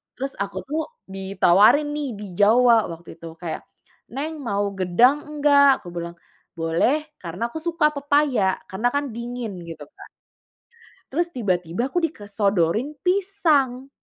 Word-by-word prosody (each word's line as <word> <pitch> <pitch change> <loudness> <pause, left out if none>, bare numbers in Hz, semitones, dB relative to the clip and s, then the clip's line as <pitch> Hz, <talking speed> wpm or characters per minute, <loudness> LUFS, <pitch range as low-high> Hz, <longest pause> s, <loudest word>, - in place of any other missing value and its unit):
Terus 270 +2 -4
aku 200 - -7
tuh 315 +2 0 0.3
ditawarin 195 +8 +4
nih 295 -2 -2
di 210 - -6
Jawa 230 +1 +5
waktu 165 +1 -13
itu 165 - -10
kayak, 170 -2 -4 0.5
"Neng 305 +4 -4
mau 200 -1 0
gedang 195 +10 +4
enggak?" 285 -2 +4
Aku - - -13
bilang, 170 0 -5 0.4
"Boleh," 180 - 0
karena 180 +7 -4
aku 320 - -7
suka 320 -1 +1
pepaya, 280 -9 +1
karena 195 +6 0
kan 285 -1 -1
dingin 235 -3 -5
gitu 165 -3 -9
kan. - - -13 1.0
Terus 340 +5 0
tiba-tiba 180 - -1
aku 355 - -4
disodorin 205 - -1
pisang. 320 -9 +1
240 Hz, 130 wpm, -23 LUFS, 190-290 Hz, 1.0 s, Jawa